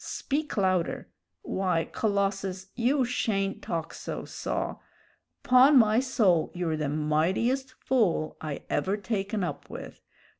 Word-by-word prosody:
Speak 295 -2 -3
louder. 185 -3 0 0.3
Why, 180 -4 0
Colossus, 195 -2 -1
you 255 +3 +2
shayn't 195 -5 -1
talk 165 -1 -4
so, - - -6
saw. - - -3 0.7
'Pon 260 +3 +7
my 220 -1 +5
soul, 210 -11 +2
you're 170 -3 -1
the 150 -2 -2
mightiest 180 - 0
fool 205 -11 +1
I 150 -3 -5
ever 195 +2 0
taken 205 -1 -2
up 175 - -5
with. - - -9
195 Hz, 120 wpm, -28 LUFS, 175-240 Hz, 0.7 s, Pon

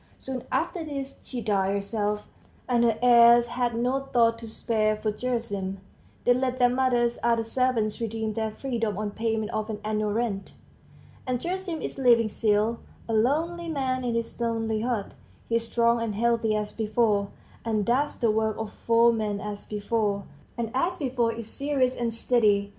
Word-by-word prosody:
Soon 260 -2 -5
after 350 -4 -1
this 275 -3 -6
she 250 -2 -5
died 200 -2 +1
herself; 210 +1 -2 0.4
and 240 -2 +3
her 230 -2 +3
heirs 235 -1 +7
had 240 0 -1
no 250 +3 +1
thought 235 -4 +2
to 230 - -8
spare 215 -1 0
for 215 0 -2
Gerasim; 210 -5 -3 0.5
they 245 - +6
let 255 0 -1
their 245 -1 +4
mother's 245 -2 +1
other 230 -1 +2
servants 230 -2 0
redeem 220 -1 -2
their 220 0 -1
freedom 225 -3 -3
on 210 -1 -2
payment 220 0 -1
of 215 0 -2
an 210 -1 -4
annual 215 -1 0
rent. 210 -3 -2 0.7
And 250 -1 0
Gerasim 355 +1 -3
is - - -5
living 235 -4 +5
still, 215 +2 +1 0.3
a 225 - -2
lonely 325 +9 +1
man 260 -4 -1
in 240 -2 -1
his 230 +1 -3
lonely 225 -2 0
hut; 230 -4 -2 0.3
he 230 - +2
is 230 0 -4
strong 235 0 +2
and 220 -3 -2
healthy 230 -1 +1
as 210 0 -2
before, 215 -2 +1 0.4
and 215 -3 0
does 270 +5 +1
the 230 -2 +2
work 220 0 0
of 220 -1 -5
four 235 0 +4
men 210 -2 -1
as 205 0 -6
before, 210 -1 -1 0.3
and 230 -2 -2
as 345 +8 0
before 250 -6 0
is 230 -1 -7
serious 265 0 0
and 235 -1 -1
steady. 215 -3 +2
230 Hz, 175 wpm, -26 LUFS, 215-250 Hz, 0.7 s, heirs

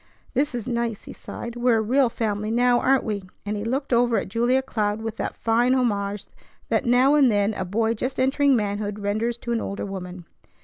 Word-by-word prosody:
"This 275 0 0
is 240 -1 -4
nice!" 235 -3 -2
he - - -9
sighed. 235 0 -8
"We're 240 -1 +2
a - - +1
real 255 +3 +3
family 215 -2 -2
now, 245 +1 +3
aren't 265 0 +3
we?" 210 -3 -2 0.2
and 210 +1 -2
he 205 - -4
looked 265 +4 -2
over 240 -1 +3
at - - -2
Julia 240 +5 +1
Cloud 210 -4 -1
with 225 0 -5
that - - -3
fine 240 +3 +2
homage 205 -5 -1 0.4
that - - +1
now 250 +4 +5
and 280 -5 +5
then 205 +1 +1
a 190 - -3
boy 220 +4 0
just 255 +4 -4
entering 270 +1 +3
manhood 205 -1 -2
renders 215 +3 -1
to 235 - -6
an 230 -1 0
older 200 - -4
woman. 180 -3 -7
230 Hz, 210 wpm, -24 LUFS, 205-250 Hz, 0.4 s, now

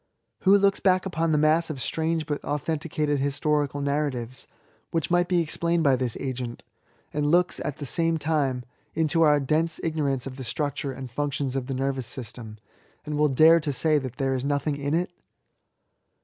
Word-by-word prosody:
Who 195 +1 +5
looks 200 0 +3
back 185 -1 +3
upon 165 -3 0
the 150 - +3
mass 155 +3 +3
of 150 -4 -5
strange 160 +3 -1
but 145 -1 -3
authen 150 +2 -2
ticated 150 -2 -1
historical 145 +1 0
narratives, 140 -4 -2 0.4
which 165 0 -2
might 175 0 +3
be 175 -1 +2
explained 170 +1 0
by 140 -3 +4
this 125 -2 -2
agent, 125 -3 -4 0.5
and 145 0 0
looks, 175 +2 +3
at 150 - -4
the 145 - -6
same 165 +4 +1
time, 145 -5 0 0.3
into 160 +1 +2
our 150 -2 +5
dense 155 +4 0
ignorance 145 -5 -1
of 135 -1 -7
the 130 - -6
structure 145 +2 -2
and 130 -2 -8
functions 140 0 -2
of 130 -2 -2
the 135 - -3
nervous 135 -2 -1
system, 115 -3 -7 0.5
and 150 0 -3
will 150 0 +4
dare 160 +5 +6
to 150 -2 -2
say 155 +2 +2
that 130 -3 -6
there 135 -1 0
is 130 -1 -2
nothing 145 +1 0
in 140 +2 -1
it? 175 +1 -1
145 Hz, 185 wpm, -26 LUFS, 135-160 Hz, 0.5 s, dare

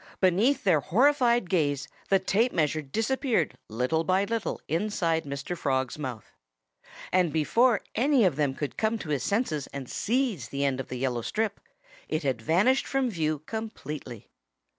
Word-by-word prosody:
Beneath 210 +10 +3
their 180 -7 +4
horrified 240 - +3
gaze 145 -6 0 0.2
the 195 - +5
tape 205 +6 +1
measure 155 0 +1
disappeared 225 - 0
little 125 +9 0
by 185 +4 +2
little 225 +1 -2
inside 165 -2 0
Mr. 140 +5 -4
Frog's 130 -3 -1
mouth. 125 -7 -6 0.8
And 180 -3 +3
before 225 - +3
any 270 0 +3
of 175 -7 +2
them 145 -2 0
could 145 0 -4
come 220 +1 +1
to 175 - -8
his 145 -4 0
senses 165 - -1
and 135 -2 -7
seize 225 - -1
the 140 0 -1
end 135 -1 0
of 135 - -4
the 125 - -5
yellow 125 -2 -1
strip, 215 - -2 0.5
it 155 - -1
had 130 -5 -1
vanished 190 - +3
from 270 -3 0
view 155 -4 -1
completely. 150 - -6
165 Hz, 160 wpm, -27 LUFS, 140-225 Hz, 0.8 s, the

